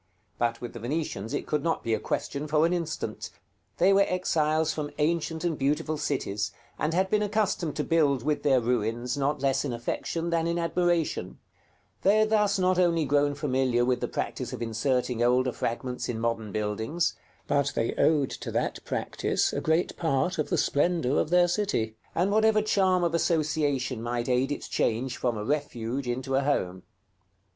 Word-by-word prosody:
But 115 -1 0
with 120 - -6
the 120 - -7
Venetians 120 -4 -3
it 145 - -2
could 150 - -1
not 165 +2 -1
be 115 - 0
a - - +1
question 145 +2 -3
for 155 +1 +3
an 170 - +1
instant; 165 -3 -3 0.5
they 190 +3 +5
were 195 - +5
exiles 160 -3 +1
from 150 -1 -3
ancient 160 +1 0
and 170 -2 0
beautiful 145 +3 0
cities, 105 -9 -2 0.3
and 150 - 0
had 190 +1 +1
been 210 - +3
accustomed 205 -6 0
to 150 - -1
build 145 -7 +2
with 150 +1 0
their 135 -3 +4
ruins, 120 +1 -1
not 140 0 -1
less 135 -1 +2
in 140 - -2
affection 165 +8 -3
than 165 0 +1
in 170 0 0
admiration: 170 - 0 0.6
they 200 +2 +4
had 215 0 +2
thus 210 -2 +3
not 185 -1 +2
only 170 -3 +3
grown 145 +1 +2
familiar 130 -4 +1
with 125 -1 +1
the - - 0
practice - - -4
of - - -5
inserting 120 +1 0
older 125 +1 +3
fragments 125 +2 -3
in 115 -2 -2
modern 115 -2 -2
buildings, 110 - -1 0.3
but 140 0 +1
they 115 - 0
owed 150 -4 +2
to - - -6
that - - -2
practice - - -1
a - - -1
great 160 +3 +1
part 160 +3 0
of 155 - -1
the - - +1
splendor 145 -3 +1
of - - 0
their 175 0 +5
city, 175 - -1 0.2
and 185 +4 +2
whatever 215 0 +4
charm 190 -4 +2
of 170 -1 +1
association 145 -7 0
might 120 0 -2
aid 130 +2 +1
its 145 - -4
change 120 +3 0
from 120 -3 -1
a 105 - -4
Refuge 135 -2 -2
into 130 +2 -2
a 135 - +3
Home. 95 -11 -1
145 Hz, 185 wpm, -27 LUFS, 125-170 Hz, 0.6 s, they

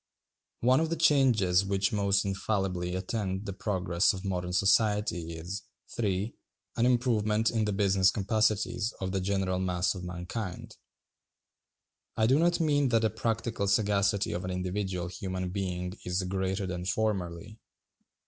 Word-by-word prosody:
One 130 +3 +4
of 160 0 0
the 165 - 0
changes 125 - +4
which 100 0 0
most 100 -1 +2
infallibly 95 -3 -1
attend 95 +1 -3
the 100 - -4
progress 95 -4 +1
of 95 0 -7
modern 90 -2 -2
society 100 -3 +2
is, 90 +6 -5 0.3
(3) 100 -1 -1 0.4
an 120 +1 +3
improvement 115 -3 +2
in 110 -2 0
the 105 - 0
business 95 -2 +3
capacities 110 +2 0
of 95 -1 -3
the 95 -1 -1
general 95 -1 0
mass 90 -1 0
of 95 -2 -8
mankind. 90 +3 -6 1.4
I 110 - +3
do 130 +6 +4
not 170 +1 +3
mean 145 -4 +2
that 115 -2 +2
the 110 - +2
practical 115 -2 -2
sagacity 100 0 +2
of 90 - -3
an 90 - -4
individual 90 0 -2
human 90 0 -4
being 90 -2 -3
is 90 +1 -1
greater 95 +1 -2
than 90 -1 -4
formerly. 95 0 -2
100 Hz, 145 wpm, -29 LUFS, 90-110 Hz, 1.4 s, One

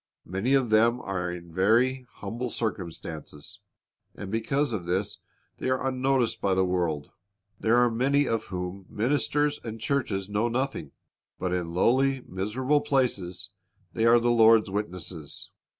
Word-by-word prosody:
Many 95 +10 +1
of 130 -5 +1
them 115 +3 +4
are 90 -5 -3
in 85 -1 -9
very 120 +7 +2
humble 120 +5 -5
circumstances, 85 -5 -5 0.6
and 95 - -7
because 125 +4 0
of 90 -5 -4
this 95 +3 -1 0.4
they - - -1
are 130 0 0
unnoticed 130 -2 +1
by 95 -1 +2
the 95 0 +3
world. 85 -6 -1 0.5
There 115 +1 +3
are 120 -1 +4
many 140 +4 +2
of 115 -1 -1
whom 90 +1 -5
ministers 145 +5 +1
and 115 -1 -6
churches 110 -7 -1
know 105 +3 0
nothing. 120 - -2 0.5
But 90 -1 -2
in 85 -2 -2
lowly, 130 +6 +3
miserable 125 +10 0
places 125 - -1 0.4
they 115 - +2
are 120 +1 +7
the 120 +1 +2
Lord's 115 -3 +5
witnesses. 90 -6 -5
110 Hz, 145 wpm, -27 LUFS, 95-130 Hz, 0.6 s, are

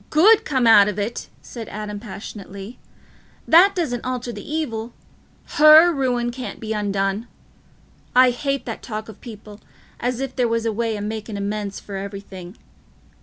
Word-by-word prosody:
"Good 400 +8 +5
come 260 -4 0
out 205 -3 +7
of 210 -1 -3
it!" 210 +3 -4 0.2
said 230 -3 -8
Adam 210 -1 -6
passionately. 200 0 -9 0.7
"That 370 +5 +6
doesn't 280 -10 -2
alter 250 -1 -4
th' - - -8
evil: 240 -7 -4 0.6
her 310 +3 +8
ruin 245 -4 0
can't 255 +1 -7
be 220 0 -4
undone. 200 +1 -1 0.9
I 255 0 +6
hate 275 +2 -3
that - - -6
talk 215 -2 -6
o' - - -13
people, 210 -1 -12 0.4
as 245 0 -2
if 270 -1 -4
there 250 -2 +1
was 230 0 -1
a 225 - 0
way 225 0 -2
o' - - -6
making 215 0 -5
amends 200 0 -4
for 200 -1 -8
everything. 195 -1 -8
225 Hz, 160 wpm, -21 LUFS, 205-255 Hz, 0.9 s, her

